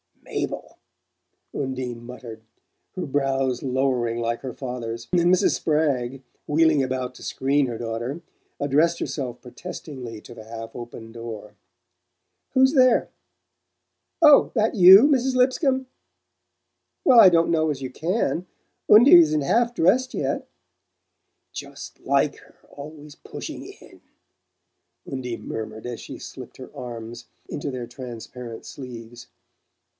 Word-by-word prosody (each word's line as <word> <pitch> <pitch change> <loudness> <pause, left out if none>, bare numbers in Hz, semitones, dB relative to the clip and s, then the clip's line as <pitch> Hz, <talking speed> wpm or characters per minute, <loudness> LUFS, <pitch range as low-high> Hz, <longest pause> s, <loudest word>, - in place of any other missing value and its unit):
"Mabel!" - - -5 0.8
Undine 130 -3 -4
muttered, 120 -2 -10 0.5
her 185 - -3
brows 135 -3 0
lowering 125 -3 0
like 115 0 -2
her 130 -3 -6
father's; 115 -3 -6
and 175 0 +3
Mrs. 185 - +4
Spragg, 135 -5 0 0.2
wheeling 155 -1 +3
about 130 -1 -2
to - - -14
screen 140 +1 +1
her 120 -2 -4
daughter, 120 +7 -4 0.4
addressed 150 +4 +2
herself 130 -5 -4
protestingly 125 -5 -8
to 120 - -12
the 110 - -12
half 115 0 -8
open 120 -1 -9
door. 115 -2 -8 1.0
"Who's 265 +1 +4
there? 255 -3 +4 1.1
Oh, 300 -3 +7
that 220 -1 +2
YOU, 190 +2 +9
Mrs. 265 -3 +2
Lipscomb? 260 +1 +2 1.2
Well, 250 -3 +7
I 190 - +10
don't 170 -1 +2
know 160 -1 +2
as 135 -2 -3
you 130 - -5
CAN 180 - -1 0.4
Undie 225 +4 +9
isn't 155 -2 +3
half 235 +11 +1
dressed 255 +10 +2
yet - - -2 0.5
" - - -53
"Just - - -9
like - - +1
her - - -19
always 150 +1 -11
pushing - - -8
in!" - - -15 1.0
Undine 125 -5 -6
murmured 110 0 -6
as 120 -1 -5
she - - -9
slipped - - -10
her - - -10
arms 120 -1 -8 0.2
into 145 - -4
their 130 -3 -5
transparent 120 -1 -9
sleeves. 120 -2 -10
135 Hz, 125 wpm, -24 LUFS, 120-170 Hz, 1.2 s, I